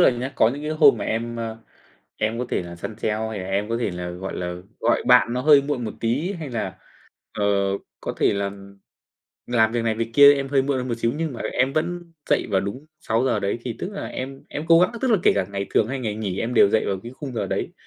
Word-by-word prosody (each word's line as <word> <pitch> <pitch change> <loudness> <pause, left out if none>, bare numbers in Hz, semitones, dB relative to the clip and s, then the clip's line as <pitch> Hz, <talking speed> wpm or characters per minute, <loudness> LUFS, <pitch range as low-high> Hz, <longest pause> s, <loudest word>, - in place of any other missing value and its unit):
là 175 - +7
nhá, 125 +2 -4
có 110 - +5
những 140 +4 -5
cái 150 - -3
hôm 150 -5 +6
mà 100 - -3
em, 115 +1 -2
ơ, 115 -1 -4 0.6
em 110 +2 -1
có 125 - -1
thể - - -1
là 85 0 -9
săn 105 +5 -7
sale 105 - 0
hay 110 - -5
là 95 - -5
em 100 +2 -1
có 115 - 0
thể 110 - 0
là, 90 0 -5
gọi 95 +2 -6
là, 90 0 -3 0.3
gọi 120 - +2
bạn 125 -1 +5
nó 125 - -1
hơi 145 0 +6
muộn 140 -4 -2
một 110 - -4
tí 135 - 0
hay 160 -7 -6
là, 95 -6 -3 0.6
ờ, 105 - -2 0.6
có - - -4
thể - - +3
là 100 0 -1 1.0
làm 115 -2 +2
việc 120 - 0
này 110 -1 +1
việc 115 +1 -3
kia 145 +2 +9
em 140 -1 -3
hơi 135 -1 +3
muộn 140 0 0
hơn 125 - -3
một 120 - 0
xíu, 115 +1 +1
nhưng 160 -2 -2
mà 120 - -8
em 130 +2 +1
vẫn 170 +2 -2 0.2
dậy - - +2
vào 95 -2 +3
đúng 115 +10 -6
6:00 115 0 +1
đấy, 100 +3 -1
thì 120 -3 -5
tức 190 +3 -5
là 200 - -5
em 135 +1 -6
em 150 +2 -5
cố 165 0 +7
gắng 180 - +4
tức 260 - +1
là 215 - +5
kể - - +5
cả - - 0
ngày 100 0 -3
thường 110 - +3
hay 135 +1 -3
ngày 110 -4 -3
nghỉ 100 -3 -3
em 120 +2 -2
đều 100 - +6
dậy 110 - +2
vào 95 - 0
cái 120 +2 -8
khung 140 -4 -6
giờ - - -1
đấy. - - -3
120 Hz, 270 wpm, -23 LUFS, 105-140 Hz, 1.0 s, kia